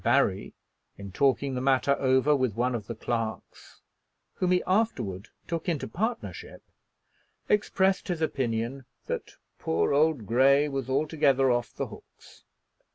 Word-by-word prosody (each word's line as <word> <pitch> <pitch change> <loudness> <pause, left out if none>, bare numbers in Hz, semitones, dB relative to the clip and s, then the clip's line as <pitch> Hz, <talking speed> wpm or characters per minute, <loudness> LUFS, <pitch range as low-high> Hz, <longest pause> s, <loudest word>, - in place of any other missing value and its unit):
Barry, - - +1 0.4
in 100 -1 -8
talking 135 +4 +1
the 125 - -2
matter 135 +1 +3
over 130 +2 +3
with 130 -6 0
one 125 +2 0
of 110 -4 -4
the 115 - -5
clerks, 115 0 -5 0.5
whom 180 - -1
he 180 - +2
afterward 125 - -1 0.2
took 170 +1 -3
into 160 -5 -2
partnership, 225 +5 -4 0.8
expressed 195 -2 +1
his 175 -4 -2
opinion 130 -3 -2 0.2
that - - -5 0.2
"poor 80 +8 0
old 145 -5 +2
Grey 135 +6 +4
was 135 -2 -4
altogether 135 -2 +2
off 120 -1 -1
the - - -2
hooks." - - -15
135 Hz, 135 wpm, -27 LUFS, 120-155 Hz, 0.8 s, Grey